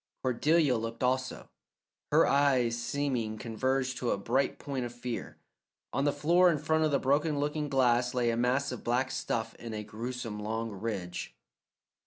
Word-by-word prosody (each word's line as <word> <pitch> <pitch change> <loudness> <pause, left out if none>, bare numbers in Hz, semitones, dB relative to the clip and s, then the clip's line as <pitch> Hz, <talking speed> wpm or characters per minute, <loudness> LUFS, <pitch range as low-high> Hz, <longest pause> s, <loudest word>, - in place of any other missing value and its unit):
Cordelia 140 +2 +3
looked 115 +2 -4
also, 130 0 -1 0.6
her - - +6
eyes 135 -4 +3
seeming 120 -2 -2
converged 130 +4 -1
to 125 - -1
a - - +1
bright 130 +7 0
point 140 -3 -4
of 120 - -4
fear. 120 0 -6 0.6
On 140 - +1
the 145 - +4
floor 170 +5 +4
in 165 - +2
front 160 +2 +1
of 155 - +3
the 140 - +3
broken 145 +3 +1
looking 150 +1 -1
glass 125 -2 +2
lay 120 -2 +2
a - - -1
mass 125 +4 +1
of 125 - -6
black 125 +2 +1
stuff 115 -1 -2
in 115 -2 -6
a 105 - -4
grewsome 115 0 -5
long 110 +2 -3
ridge. 95 -4 -5
125 Hz, 170 wpm, -30 LUFS, 115-140 Hz, 0.6 s, her